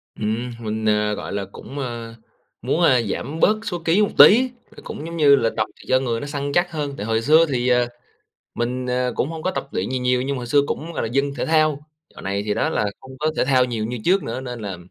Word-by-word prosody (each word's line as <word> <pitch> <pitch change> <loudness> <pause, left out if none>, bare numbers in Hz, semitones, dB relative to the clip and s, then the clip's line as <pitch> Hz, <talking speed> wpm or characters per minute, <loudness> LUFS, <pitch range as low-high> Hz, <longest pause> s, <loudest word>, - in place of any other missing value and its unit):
Ừm, 110 +3 -2
mình, 110 0 -3
ờ, 105 0 +2
gọi 100 - -6
là, 100 -1 -2
cũng, 145 - -9
ơ, 120 -3 -5 0.5
muốn, 135 +7 0
a, 130 -7 +5
giảm 140 +9 -4
bớt 215 +1 +4
số 180 -6 -3
ký 175 +6 +3
một 205 - +2
tí, 250 +5 +8 0.3
cũng 155 - -7
giống 170 0 -6
như 145 -3 +6
là 115 -3 +1
tập 110 - +1 0.2
cho 130 - +4
người 120 -3 -2
nó - - -5
săn 140 -1 -3
chắc 175 0 +2
hơn. 145 -3 -3
Tại 105 - -5
hồi 115 0 0
xưa 160 +5 +5
thì, 125 -3 -1
ờ, 125 -1 +3 0.7
mình, 125 +2 -2
ờ, 125 0 0
cũng 140 - -1
hông 160 -1 -6
có 185 - 0
tập 140 - -4
luyện 95 - -2
gì 130 0 -1
nhiều, 125 0 +1
nhưng 140 +1 -2
mà - - -4
hồi 120 - -6
xưa 140 +3 +4
cũng, 165 +2 -4
gọi - - -2
là, - - -1
dân 140 +1 0
thể - - -1
thao. 155 -2 +2 0.4
Dạo - - -10
này 100 +1 -2
thì 105 - 0
đó, - - 0
là 105 - 0
không 130 0 -13
có 155 +1 +1
thể - - +2
thao 130 -2 +4
nhiều 115 -3 -3
như 120 +2 -4
trước 190 +2 +3
nữa, 125 +3 -4
nên 125 -2 -6
là 100 -4 -5
130 Hz, 260 wpm, -22 LUFS, 115-150 Hz, 0.7 s, tí